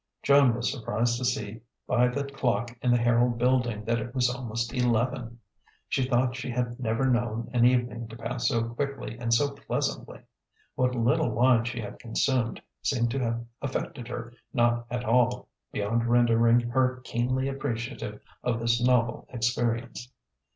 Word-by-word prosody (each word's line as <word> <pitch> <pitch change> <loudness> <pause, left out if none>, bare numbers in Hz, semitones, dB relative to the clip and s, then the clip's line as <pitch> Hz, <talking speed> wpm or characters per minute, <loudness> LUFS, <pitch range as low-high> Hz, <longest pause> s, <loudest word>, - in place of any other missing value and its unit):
Joan 140 -4 +5
was 120 0 -1
surprised 120 -2 -1
to 130 - -2
see 110 -3 -2 0.2
by 125 0 +3
the 125 +3 -2
clock 120 -3 -1
in 125 - +1
the 120 - +5
Herald 120 0 +2
building 120 -3 +1
that 115 +1 +1
it 120 +4 -6
was 125 -1 +3
almost 115 -2 -3
eleven. 120 -1 0 0.5
She 130 -2 +1
thought 125 -1 +2
she 130 +1 -5
had 120 0 -2
never 115 +1 0
known 120 -3 0
an 120 -1 +4
evening 120 -2 +1
to 115 +1 -10
pass 115 +1 -2
so 115 -3 +1
quickly 135 +1 -4
and 120 -1 -2
so 140 +5 +3
pleasantly. 135 - -3 0.5
What 125 0 +1
little 120 0 +2
wine 120 +1 +3
she 120 -1 -3
had 105 - -8
consumed 120 0 0 0.2
seemed 120 -3 +1
to 135 - -1
have 115 -1 -2 0.2
affected 130 -3 -4
her 120 -1 -6 0.2
not 120 -1 +1
at 125 -1 -3
all, 125 +2 +2 0.2
beyond 115 +3 0
rendering 120 0 +4
her 130 +2 +1
keenly 130 +2 -1
appreciative 120 -5 -4 0.2
of 120 -2 0
this 115 +1 +1
novel 125 -1 +2
experience. 120 +1 -2
120 Hz, 160 wpm, -27 LUFS, 115-125 Hz, 0.5 s, Joan